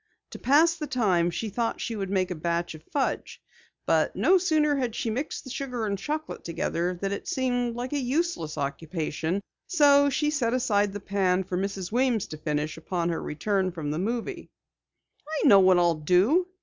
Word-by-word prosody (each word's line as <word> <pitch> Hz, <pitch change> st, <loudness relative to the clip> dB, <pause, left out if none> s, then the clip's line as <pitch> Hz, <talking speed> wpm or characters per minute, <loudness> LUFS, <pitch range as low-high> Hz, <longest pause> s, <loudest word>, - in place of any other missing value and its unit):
To -, -, -8 dB
pass 305 Hz, +6 st, +4 dB
the 305 Hz, -2 st, -4 dB
time, 190 Hz, -10 st, +2 dB
she 215 Hz, +6 st, -3 dB
thought 230 Hz, +3 st, -2 dB
she 230 Hz, -, -3 dB
would 195 Hz, -3 st, -3 dB
make 190 Hz, -2 st, 0 dB
a -, -, +1 dB
batch 170 Hz, +1 st, -2 dB
of 155 Hz, -, -11 dB
fudge. 280 Hz, -2 st, -2 dB, 0.5 s
But, -, -, +2 dB
no 375 Hz, 0 st, +4 dB
sooner 310 Hz, -4 st, +2 dB
had 245 Hz, -4 st, -2 dB
she 225 Hz, -, -2 dB
mixed 270 Hz, +7 st, -4 dB
the 260 Hz, -, -9 dB
sugar 250 Hz, -4 st, -3 dB
and 200 Hz, -1 st, -1 dB
chocolate 300 Hz, +10 st, -4 dB
together 170 Hz, +1 st, -2 dB
than 195 Hz, +1 st, -2 dB
it 200 Hz, -, -5 dB
seemed 245 Hz, -2 st, 0 dB
like 250 Hz, +3 st, -4 dB
a 290 Hz, -, +1 dB
useless 260 Hz, -, -1 dB
occupation, 160 Hz, +4 st, -2 dB, 0.3 s
so 285 Hz, -4 st, +5 dB
she 295 Hz, +2 st, 0 dB
set 250 Hz, -5 st, 0 dB
aside 205 Hz, -5 st, +1 dB
the 205 Hz, -, -4 dB
pan 190 Hz, -2 st, +1 dB
for 185 Hz, 0 st, -4 dB
Mrs. 190 Hz, 0 st, -3 dB
Weems 245 Hz, -3 st, +1 dB
to 155 Hz, -, -7 dB
finish 150 Hz, 0 st, -2 dB
upon 170 Hz, +1 st, -2 dB
her 165 Hz, -, -2 dB
return 190 Hz, +4 st, -1 dB
from 160 Hz, -4 st, -4 dB
the 155 Hz, -, -2 dB
movie. 240 Hz, -, -3 dB, 0.9 s
"I -, -, +5 dB
know 200 Hz, -6 st, +8 dB
what 185 Hz, -1 st, +5 dB
I'll 175 Hz, -1 st, +4 dB
do!" 185 Hz, -, +3 dB
205 Hz, 190 wpm, -27 LUFS, 175-260 Hz, 0.9 s, know